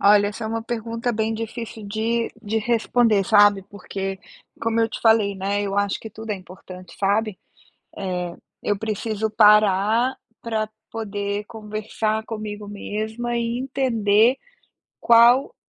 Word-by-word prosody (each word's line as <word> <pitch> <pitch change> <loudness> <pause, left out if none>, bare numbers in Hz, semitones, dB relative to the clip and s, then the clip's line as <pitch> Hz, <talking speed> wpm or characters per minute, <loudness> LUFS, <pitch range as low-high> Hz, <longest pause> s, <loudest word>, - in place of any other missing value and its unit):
Olha, 205 0 +6
essa 210 +2 -6
é - - -2
uma 225 +1 -3
pergunta 230 +1 -3
bem 220 0 -1
difícil 225 0 -6
de 225 +3 -1
de 220 +1 -1
responder, 225 -2 +2
sabe, 205 -1 +5
porque 195 0 -6 0.4
como 230 0 +1
eu 225 - +2
te - - -7
falei, 220 -3 +4
né, 200 +2 -1
eu 200 -1 -3
acho 205 -1 0
que 220 - -8
tudo 220 +1 -8
é - - -1
importante, 185 -1 -12
sabe, 205 +1 0 0.6
eh, 180 -2 -3 0.3
eu 205 -1 0
preciso 220 0 -2
parar 210 +3 +4 0.3
pra 220 -2 -2 0.2
poder 205 -2 -3
conversar 215 0 -3
comigo 215 -2 -6
mesma 220 +4 -4
e 235 0 -1
entender 245 -3 +2 0.6
qual 235 - +5
215 Hz, 140 wpm, -23 LUFS, 205-230 Hz, 0.6 s, Olha